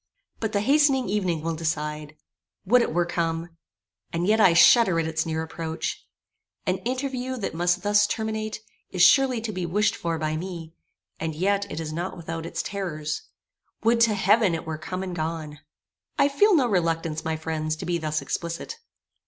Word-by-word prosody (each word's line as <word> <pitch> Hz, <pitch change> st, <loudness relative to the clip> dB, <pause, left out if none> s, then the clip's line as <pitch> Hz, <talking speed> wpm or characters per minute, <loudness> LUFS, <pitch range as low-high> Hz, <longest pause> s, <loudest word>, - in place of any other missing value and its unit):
But 220 Hz, -1 st, -2 dB
the 200 Hz, -, +1 dB
hastening 275 Hz, +1 st, +3 dB
evening 185 Hz, -6 st, 0 dB
will 165 Hz, 0 st, -1 dB
decide. 150 Hz, -1 st, -3 dB, 0.5 s
Would 245 Hz, +6 st, +5 dB
it -, -, 0 dB
were 175 Hz, +2 st, +1 dB
come! 165 Hz, -1 st, -2 dB, 0.6 s
And 170 Hz, +1 st, -1 dB
yet 215 Hz, +3 st, +3 dB
I 185 Hz, -4 st, +6 dB
shudder 185 Hz, -1 st, +6 dB
at 165 Hz, -, 0 dB
its 160 Hz, +1 st, -1 dB
near 160 Hz, 0 st, -1 dB
approach. 160 Hz, 0 st, -5 dB, 0.6 s
An -, -, 0 dB
interview 260 Hz, 0 st, -3 dB
that 210 Hz, -, -3 dB
must 175 Hz, +2 st, +1 dB
thus 205 Hz, 0 st, +4 dB
terminate, 220 Hz, -1 st, -3 dB, 0.3 s
is 180 Hz, -1 st, +2 dB
surely 265 Hz, +1 st, +5 dB
to 220 Hz, -1 st, -3 dB
be 185 Hz, -3 st, -4 dB
wished 210 Hz, +5 st, +1 dB
for 165 Hz, -1 st, -2 dB
by 155 Hz, 0 st, -2 dB
me; 165 Hz, -2 st, -7 dB, 0.5 s
and 160 Hz, -1 st, -3 dB
yet 200 Hz, +4 st, 0 dB
it 155 Hz, -, -4 dB
is 155 Hz, -1 st, -4 dB
not 175 Hz, +3 st, -4 dB
without 165 Hz, -1 st, -5 dB
its -, -, -3 dB
terrors. 155 Hz, -6 st, -4 dB, 0.6 s
Would 230 Hz, +1 st, +3 dB
to 225 Hz, -2 st, +4 dB
heaven 200 Hz, -1 st, +3 dB
it 165 Hz, -, -6 dB
were 160 Hz, -1 st, -4 dB
come 185 Hz, +3 st, -4 dB
and 185 Hz, -2 st, -5 dB
gone! 155 Hz, -2 st, -4 dB, 0.6 s
I 280 Hz, -, +4 dB
feel 405 Hz, +8 st, +4 dB
no 275 Hz, -6 st, +4 dB
reluctance, 165 Hz, -5 st, 0 dB
my 160 Hz, 0 st, -1 dB
friends 155 Hz, -1 st, -2 dB
to -, -, -7 dB
be 175 Hz, -1 st, 0 dB
thus 155 Hz, -2 st, -2 dB
explicit. 170 Hz, -, -4 dB
175 Hz, 180 wpm, -25 LUFS, 160-215 Hz, 0.6 s, I